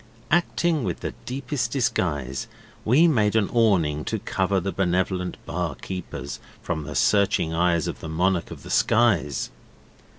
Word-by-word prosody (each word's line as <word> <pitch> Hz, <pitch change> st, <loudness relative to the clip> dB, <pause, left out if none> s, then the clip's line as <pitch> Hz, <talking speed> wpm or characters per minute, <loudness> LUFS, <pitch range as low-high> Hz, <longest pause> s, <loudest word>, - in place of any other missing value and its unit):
Acting 170 Hz, -3 st, +2 dB
with 90 Hz, -3 st, -3 dB
the -, -, -4 dB
deepest 125 Hz, -2 st, -2 dB
disguise, 85 Hz, -, -1 dB, 0.4 s
we 140 Hz, +10 st, +5 dB
made 110 Hz, -9 st, +2 dB
an 110 Hz, -3 st, +2 dB
awning 90 Hz, -11 st, +3 dB
to -, -, -1 dB
cover 95 Hz, +1 st, 0 dB
the 95 Hz, +2 st, -2 dB
Benevolent 90 Hz, 0 st, 0 dB
Bar 85 Hz, -4 st, -2 dB
keepers 90 Hz, -6 st, -6 dB, 0.2 s
from 80 Hz, -3 st, -3 dB
the 75 Hz, -, -6 dB
searching 85 Hz, +3 st, +3 dB
rays 85 Hz, -1 st, +2 dB
of -, -, -4 dB
the 80 Hz, -, -7 dB
monarch 90 Hz, +2 st, +1 dB
of -, -, -10 dB
the -, -, -8 dB
skies. 95 Hz, -, +2 dB
95 Hz, 145 wpm, -24 LUFS, 80-115 Hz, 0.4 s, we